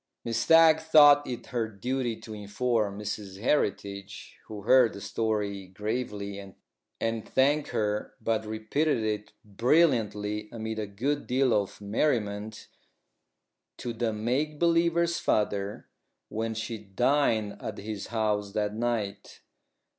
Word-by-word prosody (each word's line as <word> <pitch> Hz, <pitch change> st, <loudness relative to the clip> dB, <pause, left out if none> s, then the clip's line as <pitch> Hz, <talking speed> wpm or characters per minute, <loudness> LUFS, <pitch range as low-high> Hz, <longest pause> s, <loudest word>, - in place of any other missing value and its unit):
Miss 115 Hz, -1 st, -1 dB
Stagg 165 Hz, +3 st, +6 dB
thought 145 Hz, -2 st, +6 dB
it 125 Hz, -2 st, -5 dB
her 115 Hz, -2 st, 0 dB
duty 120 Hz, +3 st, -3 dB
to 110 Hz, -, -8 dB
inform 105 Hz, 0 st, -1 dB
Mrs 100 Hz, -2 st, -5 dB
Heritage, 100 Hz, -5 st, -2 dB
who 105 Hz, -2 st, -8 dB
heard 125 Hz, +1 st, +5 dB
the 100 Hz, -, -8 dB
story 100 Hz, -1 st, -2 dB
gravely, 105 Hz, 0 st, -4 dB, 0.6 s
and 115 Hz, -1 st, -2 dB
thanked 145 Hz, +3 st, +2 dB
her, 105 Hz, -1 st, -2 dB
but 110 Hz, -1 st, 0 dB
repeated 110 Hz, +8 st, 0 dB
it 105 Hz, -1 st, -3 dB
brilliantly, 105 Hz, -, +1 dB
amid 110 Hz, -1 st, -4 dB
a 105 Hz, -, -3 dB
good 135 Hz, +9 st, -2 dB
deal 130 Hz, -1 st, +2 dB
of 100 Hz, -2 st, -1 dB
merriment, 105 Hz, -1 st, -1 dB, 1.1 s
to 120 Hz, -, -4 dB
the 115 Hz, 0 st, -1 dB
make 130 Hz, +8 st, -1 dB
believer's 170 Hz, +1 st, +2 dB
father, 100 Hz, -1 st, -1 dB, 0.4 s
when 110 Hz, +1 st, -3 dB
she 110 Hz, 0 st, -4 dB
dined 110 Hz, +1 st, +1 dB
at 105 Hz, -, -5 dB
his 105 Hz, -1 st, -6 dB
house 105 Hz, -3 st, -1 dB
that 105 Hz, -1 st, -1 dB
night. 115 Hz, -3 st, -3 dB
110 Hz, 125 wpm, -28 LUFS, 105-125 Hz, 1.1 s, Stagg